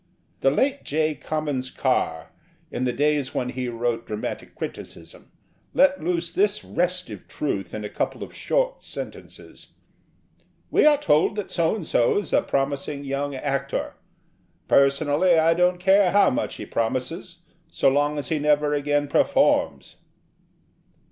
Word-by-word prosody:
The 135 - +3
late 270 - 0
J. 155 +1 0
Comyns 145 -4 -3
Carr, 80 0 -1 0.4
in 130 - -2
the 125 - +1
days 145 0 0
when 125 - -1
he 125 -1 -3
wrote 115 0 -2
dramatic 105 0 -5
criticism, - - -9 0.4
let 280 - +4
loose 170 0 -1
this 205 +1 +1
restive 180 +1 -3
truth 95 -11 -3
in 105 -1 -5
a - - -2
couple - - -3
of - - -10
short - - -1
sentences - - -10 1.0
'We - - +4
are 295 -1 +6
told 160 - +2
that 210 -2 -5
So 170 +2 +1
and 200 -7 -6
so 120 - +2
is 205 - -3
a - - +5
promising 140 +1 -2
young 140 0 -3
actor. 140 0 -2 0.7
Personally 145 +5 +3
I 160 +1 +4
don't 180 +1 +2
care 190 +1 +4
how 205 +9 +4
much 290 +3 -2
he - - -7
promises 130 +9 -3 0.3
so - - +1
long 145 +2 +2
as 140 -3 -4
he 160 - 0
never 150 0 +2
again 145 0 0
performs.' - - +1
150 Hz, 145 wpm, -24 LUFS, 135-180 Hz, 1.0 s, are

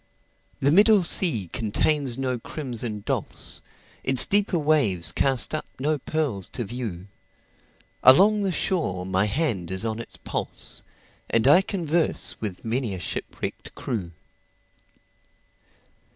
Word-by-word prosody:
The 140 - +2
middle 205 +3 +6
sea 150 - +2
contains 130 +3 0
no 130 -2 -2
crimson 120 -6 -4
dulse, - - -4 0.4
Its 130 -1 +4
deeper 205 -2 +2
waves 145 - +1
cast 135 0 +1
up 155 - -3
no 150 +3 0
pearls 135 - -2
to 120 - -2
view; 110 -5 -6 1.0
Along 205 +11 +6
the 195 -2 0
shore 155 - -1
my 95 +2 +1
hand 110 - -1
is 95 +4 -1
on 110 0 -2
its 115 - -9
pulse, - - -5 0.5
And 115 +2 +2
I 150 +7 +7
converse 170 -4 0
with 105 -3 -5
many 115 -3 -1
a - - -7
shipwrecked - - -5
crew. 100 -8 -4
130 Hz, 125 wpm, -25 LUFS, 105-155 Hz, 1.0 s, I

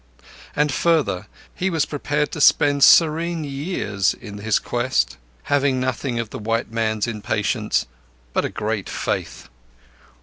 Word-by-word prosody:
And 150 0 +2
further, 150 - +1 0.3
he 190 +1 -1
was 160 -4 +1
prepared 150 0 -2
to 150 - -4
spend 145 -1 +4
serene 165 +1 +5
years 135 - -1
in 105 -4 -10
his 110 +1 +1
quest; 65 - -1 0.3
having 140 -2 +1
nothing 130 0 -2
of 115 -2 -3
the - - -6
white 115 +1 -2
man's 110 -2 0
impatience, 105 0 -1 0.5
but - - +1
a - - -1
great 105 -2 -3
faith. - - -3
125 Hz, 135 wpm, -22 LUFS, 105-150 Hz, 0.5 s, serene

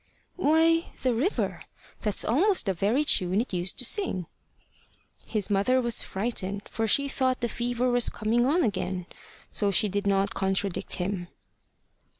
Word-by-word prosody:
"Why, 330 0 +3 0.2
the 255 -2 +2
river. 285 - -1 0.4
That's 210 -3 +1
almost 360 - +2
the 195 - +1
very 210 - +1
tune 185 -8 +2
it 235 -3 -3
used 180 0 -1
to 250 - +3
sing." 230 - +2 1.0
His 210 -2 -1
mother 205 +6 +2
was 235 -3 +1
frightened, 200 -1 -3
for 225 0 -2
she 280 +6 +2
thought 260 -2 0
the 240 - +1
fever 245 +2 -2
was 245 -1 +3
coming 230 +3 0
on 330 +5 +2
again. 185 -5 -2 0.5
So 205 - +1
she 200 +2 +3
did 200 +1 -2
not 195 0 +1
contradict 195 -1 -1
him. 180 -1 -3
225 Hz, 150 wpm, -27 LUFS, 195-255 Hz, 1.0 s, Why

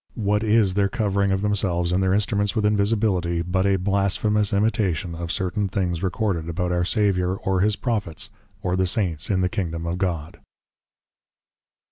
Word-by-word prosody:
What 105 -1 +1
is 105 -3 +3
their 100 0 +2
Covering 100 -4 0
of 95 +1 0
themselves 95 -4 0
and 90 +2 +2
their 95 0 +2
Instruments 105 +1 0
with 110 -2 +1
Invisibility? 100 -5 +1
But 95 +2 0
a 100 - +3
Blasphemous 100 +2 +1
Imitation 100 - 0
of 85 0 -4
certain 95 +2 -1
Things 90 -3 -2
recorded 95 -3 -1
about 90 +1 -2
our 90 0 +1
Saviour 95 -2 +1
or 95 -2 -1
His 105 +1 +2
Prophets, 105 -9 -2 0.3
or 90 -1 0
the 95 0 +1
Saints 90 -6 -1
in 95 -3 +1
the 90 - +2
Kingdom 85 -3 -2
of 85 +2 -2
God. 85 -5 -3
95 Hz, 165 wpm, -23 LUFS, 90-105 Hz, 0.3 s, is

